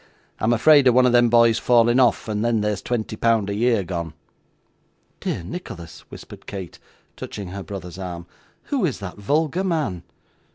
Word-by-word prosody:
I'm 110 Hz, -, +1 dB
afraid 140 Hz, +4 st, +5 dB
of 125 Hz, -, +4 dB
one 130 Hz, 0 st, +5 dB
of 125 Hz, -, +4 dB
them 120 Hz, 0 st, +4 dB
boys 115 Hz, -1 st, +4 dB
falling 120 Hz, 0 st, +3 dB
off 125 Hz, -3 st, +2 dB
and 105 Hz, 0 st, -2 dB
then 115 Hz, -2 st, +1 dB
there's 105 Hz, -2 st, -1 dB
twenty 110 Hz, -3 st, -3 dB
pound 110 Hz, -3 st, +1 dB
a -, -, -2 dB
year 115 Hz, -1 st, +1 dB
gone.' 85 Hz, -3 st, -5 dB, 1.0 s
'Dear -, -, -3 dB
Nicholas,' 85 Hz, -, -9 dB
whispered -, -, -12 dB
Kate, 95 Hz, -4 st, -7 dB, 0.4 s
touching 100 Hz, -3 st, -7 dB
her 100 Hz, +2 st, -6 dB
brother's 95 Hz, -2 st, -8 dB
arm, 85 Hz, -2 st, -6 dB, 0.4 s
'who 275 Hz, -6 st, -2 dB
is 150 Hz, -8 st, 0 dB
that 100 Hz, -2 st, -8 dB
vulgar 155 Hz, -, 0 dB
man? 155 Hz, -, -1 dB
115 Hz, 170 wpm, -22 LUFS, 95-125 Hz, 1.0 s, afraid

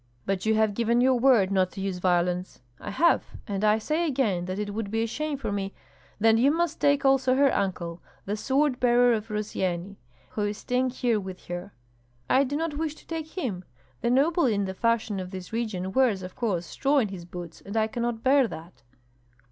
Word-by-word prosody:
"But 195 Hz, +1 st, -1 dB
you 220 Hz, -, +4 dB
have 215 Hz, -1 st, +2 dB
given 235 Hz, +2 st, +1 dB
your 260 Hz, +1 st, +4 dB
word 235 Hz, -7 st, +4 dB
not 185 Hz, -2 st, +2 dB
to -, -, -8 dB
use 190 Hz, -2 st, -3 dB
violence." 180 Hz, 0 st, 0 dB, 0.2 s
"I -, -, -7 dB
have, 330 Hz, +12 st, +3 dB, 0.2 s
and 200 Hz, -1 st, -3 dB
I 215 Hz, 0 st, +4 dB
say 310 Hz, +9 st, -1 dB
again 225 Hz, -, 0 dB
that 185 Hz, +1 st, -4 dB
it 205 Hz, 0 st, -3 dB
would 215 Hz, -1 st, -3 dB
be 225 Hz, +2 st, 0 dB
a -, -, +1 dB
shame 295 Hz, +5 st, -3 dB
for 260 Hz, -, -4 dB
me 195 Hz, -1 st, -3 dB, 0.2 s
" -, -, -30 dB
"Then 225 Hz, +1 st, +4 dB
you 265 Hz, +4 st, +5 dB
must 330 Hz, +1 st, 0 dB
take 285 Hz, -1 st, +3 dB
also 265 Hz, -1 st, +4 dB
her 275 Hz, 0 st, +4 dB
uncle, 175 Hz, -4 st, -2 dB, 0.2 s
the 205 Hz, -, -2 dB
sword 265 Hz, +4 st, +1 dB
bearer 245 Hz, 0 st, +4 dB
of 220 Hz, -1 st, -2 dB
Rossyeni, 200 Hz, -3 st, -3 dB, 0.3 s
who 215 Hz, -, -4 dB
is 205 Hz, 0 st, -1 dB
staying 250 Hz, +2 st, 0 dB
here 240 Hz, -3 st, 0 dB
with 190 Hz, -2 st, -8 dB
her." 175 Hz, +3 st, -6 dB, 0.6 s
"I 265 Hz, +2 st, +4 dB
do 280 Hz, +1 st, -3 dB
not 315 Hz, -2 st, -2 dB
wish 315 Hz, -2 st, -2 dB
to -, -, -18 dB
take 320 Hz, +1 st, -6 dB
him. 205 Hz, -, -3 dB, 0.4 s
The -, -, +1 dB
noble 295 Hz, +5 st, +3 dB
in 205 Hz, -4 st, +1 dB
the 190 Hz, -, -4 dB
fashion 225 Hz, -1 st, 0 dB
of 185 Hz, -1 st, -5 dB
this 185 Hz, +1 st, -8 dB
region 210 Hz, -5 st, -2 dB
wears, 230 Hz, -6 st, +2 dB
of 185 Hz, 0 st, -8 dB
course, 195 Hz, -8 st, -1 dB
straw 280 Hz, -, 0 dB
in 230 Hz, -7 st, +2 dB
his 180 Hz, -3 st, -8 dB
boots, 175 Hz, -1 st, -9 dB
and 200 Hz, +3 st, -5 dB
I 220 Hz, -, +3 dB
cannot 235 Hz, +1 st, -3 dB
bear 270 Hz, -1 st, +4 dB
that." 160 Hz, -, -10 dB
220 Hz, 215 wpm, -26 LUFS, 190-260 Hz, 0.6 s, you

